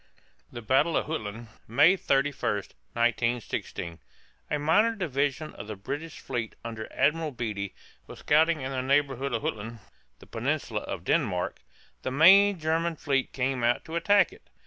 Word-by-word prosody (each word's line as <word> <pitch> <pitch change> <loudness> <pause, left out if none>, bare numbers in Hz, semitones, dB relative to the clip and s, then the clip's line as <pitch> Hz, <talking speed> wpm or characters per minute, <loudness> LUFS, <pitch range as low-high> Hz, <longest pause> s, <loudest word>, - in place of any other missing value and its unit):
THE 120 - -8
BATTLE 135 +8 +3
OF - - 0
JUTLAND, 115 -6 -5 0.2
MAY 145 - +5
31, 140 - 0 0.4
1916. 115 -7 -1 0.5
A 150 - 0
minor 175 +10 +3
division 145 -4 -1
of - - -9
the 110 - -5
British 145 +11 -6
fleet 120 -4 -4
under 110 -1 -6
Admiral 160 +2 +1
Beatty 105 -6 -4 0.3
was - - -10
scouting 155 +1 +3
in 130 +1 -4
the 130 -1 -1
neighborhood 140 0 +1
of 115 -2 -2
Jutland 110 +2 -4 0.4
(the - - -16
peninsula - - -2
of - - -6
Denmark). 90 0 0 0.4
The - - -3
main 190 +8 +6
German 165 +1 0
fleet 140 -3 -1
came 130 -1 -1
out 120 +1 +1
to 160 - -6
attack 200 +4 +3
it. - - -19
135 Hz, 150 wpm, -27 LUFS, 120-160 Hz, 0.5 s, main